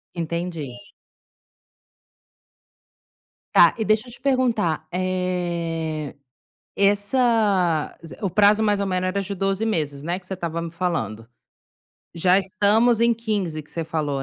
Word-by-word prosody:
Entendi. 165 -5 -4 2.8
Tá, 170 - +7
e 220 - -1
deixa 215 +3 +2
eu - - -11
te 235 - -14
perguntar, 230 - +1
eh, 170 -4 -2 0.6
essa 205 - +2 0.2
o 195 - 0
prazo, 210 +3 +4
mais 210 -2 +2
ou 200 - -1
menos, 185 -1 0
era 200 +2 -1
de 200 +1 -4
12 195 +3 -1
meses, 150 -9 -1
né, 170 +2 -1
que 180 - -22
você 190 - -4
estava 170 -2 -4
me 165 - -5
falando. 115 - -3 0.9
Já 180 +2 +4
estamos 210 +5 +2
em 235 0 +4
15, 205 -9 -2
que 150 - -21
você 165 - -3
falou, 150 -4 -2
185 Hz, 130 wpm, -23 LUFS, 165-205 Hz, 2.8 s, Tá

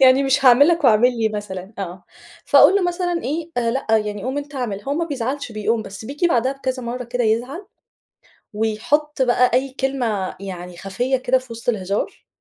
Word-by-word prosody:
يعني 260 +1 +6
مش 275 +1 +1
هاعمل 260 +5 +7
لك 335 -2 +1
واعمل 240 +1 +4
لي 220 - +2
مثلًا 205 -2 -6
آه، 185 -1 -6 0.4
فأقول - - +6
له 400 - +1
مثلًا 350 -1 -1
إيه، 320 +5 -3
آآ 235 -1 +1
لأ، 265 +3 -3
يعني 210 -2 -3
قوم 260 +3 -2
أنتَ 290 0 -7
أعمل 230 -7 -3
هو 275 +4 -2
ما 335 +2 0
بيزعلش 275 -3 -4
بيقوم، 220 +1 -1
بس 200 +1 -9
بييجي 285 +8 -1
بعدها 260 -5 +1
بكذا 260 -2 -4
مرة 245 +1 -4
كده 245 0 -2
يزعل، 250 - -1 0.9
ويحط 225 +8 0
بقى 250 0 +3
أي 265 +2 +1
كلمة 240 -8 -1
يعني 180 -2 -7
خفية 245 +9 -1
كده 260 0 +1
في 255 -2 -11
وسط 230 +1 -10
الهزار 200 -3 -2
245 Hz, 190 wpm, -21 LUFS, 215-275 Hz, 0.9 s, هاعمل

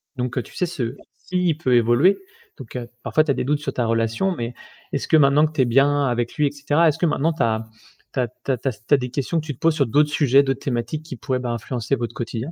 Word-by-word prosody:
Donc 125 -1 -3
heu, - - +2
tu - - -16
sais 180 - 0
ce 130 -8 -4 0.3
s'il 180 -4 0
peut 130 -5 0
évoluer, 120 - +4 0.4
donc 130 -5 -11
heu, 120 -1 -5
parfois 155 - +2
tu 155 - 0
as - - +3
des - - -2
doutes 145 +2 +1
sur 140 -3 -4
ta 120 - 0
relation 115 +11 0
mais 120 -2 -4 0.4
est-ce - - -2
que - - +4
maintenant 145 +1 +5
que 155 - -3
tu 150 - +1
es - - +4
bien 140 +4 +3
avec 120 -2 -1
lui, 150 - +2
et - - -2
cetera, 145 +3 +2
est-ce 150 - -1
que - - +1
maintenant 160 +1 +1
tu 160 - 0
as 110 -1 0 0.5
tu - - -2
as 125 - +1
tu 125 +3 -6
as 130 - +1
tu 130 - -5
as - - +5
s 105 -2 -16
tu - - +2
as - - +8
des 125 -1 -4
questions 140 +6 -1
que 155 - -6
tu 150 - -4
te - - -31
poses 165 -1 +2
sur 140 - +2
d'autres 150 +6 +3
sujets, 140 -2 +4
d'autres 135 -1 -1
thématiques 125 +4 -3
qui 155 -4 -8
pourraient, 130 +1 -2
ben, 125 -1 -3
influencer 120 +2 -2
votre 120 -2 -4
quotidien? 120 +4 -4
135 Hz, 295 wpm, -22 LUFS, 120-150 Hz, 0.5 s, as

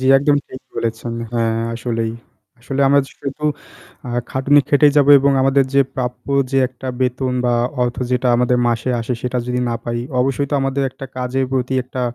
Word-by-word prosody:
জি, - - -3
একদম 145 +1 +2
ঠিক 130 - -9
বলেছেন, 115 +1 -3 0.2
হ্যাঁ 115 -1 0 0.2
আসলেই 115 -1 -2 0.5
আসলে 135 +2 -3
আমরা 140 +1 +5 0.2
শুধু 140 +2 -6 0.6
আ - - -5 0.2
খাটুনি 140 +2 +4
খেটেই 145 0 +5
যাবো 145 0 +5
এবং 140 +1 +3
আমাদের 135 0 +3
যে 140 - +6
প্রাপ্য 125 -1 -4 0.2
যে 135 - +2
একটা 130 +1 -11
বেতন 130 0 0
বা 120 - +2 0.3
অর্থ 120 0 -1
যেটা 125 0 +1
আমাদের 125 0 +2
মাসে 115 +1 -1
আসে 115 +2 -3
সেটা 125 0 -1
যদি 125 0 -1
না 120 - -1
পাই 120 0 -2 0.2
অবশ্যই 135 +2 0
তো - - 0
আমাদের 135 +1 -1
একটা 135 - -10
কাজের 130 +1 -1
প্রতি 130 0 -1
একটা 130 0 -6
130 Hz, 185 wpm, -19 LUFS, 125-135 Hz, 0.6 s, যে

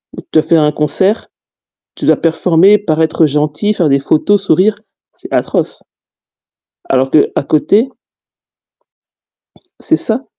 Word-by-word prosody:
de - - -10
te 155 - +3
faire 160 +1 +2
un 150 - +2
concert, 190 +8 -1 0.7
tu - - -5
dois - - +5
performer, 175 +4 +2
paraître 160 -3 0
gentil, 150 +7 -1
faire 170 -6 0
des 140 0 +2
photos, 190 +8 +1
sourire. 195 +4 +2 0.4
C'est - - -13
atroce! - - -2 1.1
Alors 130 0 0
qu'à 150 - +1
côté 205 - +2 1.9
c'est 320 - 0
ça 235 +1 -1
165 Hz, 120 wpm, -13 LUFS, 150-205 Hz, 1.9 s, dois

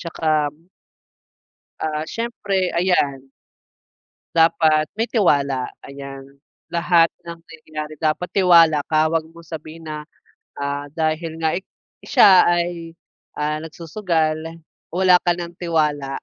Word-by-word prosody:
tsaka 155 -3 0 1.3
Ah, 155 0 -2
syempre 200 -3 -2
ayan. 145 -7 +1 1.1
Dapat 160 -2 +3
may 225 - +1
tiwala 140 - +1 0.2
ayan. 140 -1 -9 0.5
Lahat 170 0 +4 0.2
ng 170 0 -8
nangyayari 155 -2 -8
dapat 155 +3 0
tiwala 170 -6 +5
ka, 155 0 +3
wag 160 0 +1
mong 170 0 -15
sabihin 160 0 -9
na, 150 0 -7 0.5
ah, 145 0 -3
dahil 160 +2 -2
nga 160 -1 0
ik 190 - -4 0.3
siya 200 -9 +6
ay, 170 -1 -1 0.4
ah, 150 +1 -1
nagsusugal 165 -1 -2 0.3
wala 185 +1 +3
ka 175 -1 +1
ng 170 -1 -6
tiwala. 150 -5 0
160 Hz, 110 wpm, -21 LUFS, 155-170 Hz, 1.3 s, siya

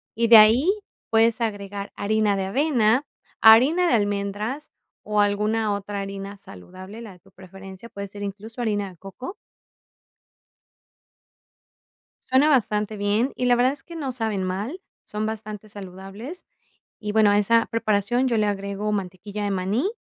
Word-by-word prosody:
y 230 +1 +1
de 230 -1 +10
ahí 225 - +6 0.4
puedes 225 +1 +3
agregar 200 -2 -4
harina 210 0 +1
de 195 - -2
avena, 250 +2 +2 0.4
harina 270 +11 +7
de 245 - +3
almendras 205 +6 -2 0.3
o 210 0 -1
alguna 210 +1 +1
otra 200 0 -4
harina 195 0 -7
saludable, 185 - -11
la 220 -4 -9
de 180 - -19
tu - - -24
preferencia, 190 +3 -12
puede 200 -2 -7
ser 205 +1 -11
incluso 215 +4 -7
harina 205 -3 -1
de 180 - -18
coco. 195 - -9 2.9
Suena 265 +4 +4
bastante 215 -5 +1
bien 210 +6 +1
y 250 - -2
la 245 - +4
verdad 250 +2 +3
es 280 - -11
que 335 +2 -10
no 275 -5 -3
saben 220 -5 -2
mal, 205 - -4 0.2
son 210 +1 -4
bastante 215 -1 -6
saludables 200 - -9 0.5
y, 210 -1 -4
bueno, 215 -1 +4
a 205 - +4
esa 230 +3 +3
preparación 230 +2 0
yo 230 - +1
le 215 - +2
agrego 200 +1 -3
mantequilla 200 +1 -5
de 205 - -1
maní 200 - 0
210 Hz, 155 wpm, -24 LUFS, 200-230 Hz, 2.9 s, de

